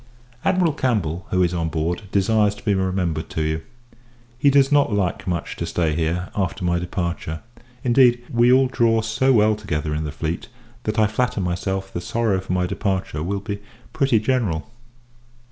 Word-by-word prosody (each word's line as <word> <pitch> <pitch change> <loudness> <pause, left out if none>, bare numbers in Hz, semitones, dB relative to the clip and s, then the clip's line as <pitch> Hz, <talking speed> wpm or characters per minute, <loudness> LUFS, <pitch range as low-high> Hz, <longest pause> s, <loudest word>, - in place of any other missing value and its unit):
Admiral 180 -5 +2
Campbell, 95 - -1
who 90 0 +2
is 90 0 +1
on 85 -2 -1
board, 85 +5 -2
desires 105 +1 +2
to - - -15
be 105 - +3
remembered 95 -4 -1
to 80 - -2
you. 80 +1 -1 0.7
He 140 +4 +3
does 140 0 +4
not 145 -5 +4
like 100 -2 -1
much 85 -2 -2
to 85 - -2
stay 80 -2 0
here, 85 +3 -1
after 95 -2 -2
my 85 0 +1
departure. 85 -3 -3 0.4
Indeed, 120 -1 +4
we 120 +1 +5
all 130 +1 +6
draw 115 -3 +2
so 120 +5 +1
well 110 -3 +4
together 75 -8 -3
in 75 +1 -2
the 75 - -4
fleet, 80 +3 -4 0.4
that 110 0 -1
I 110 - +5
flatter 110 +2 0
myself 95 +1 -2
the 85 - -3
sorrow 110 -2 0
for 95 - -7
my 90 0 +1
departure 95 -4 -2
will 100 +4 -2
be 100 0 -4 0.3
pretty 135 -5 +3
general. 110 -6 -1
95 Hz, 180 wpm, -22 LUFS, 85-115 Hz, 0.7 s, all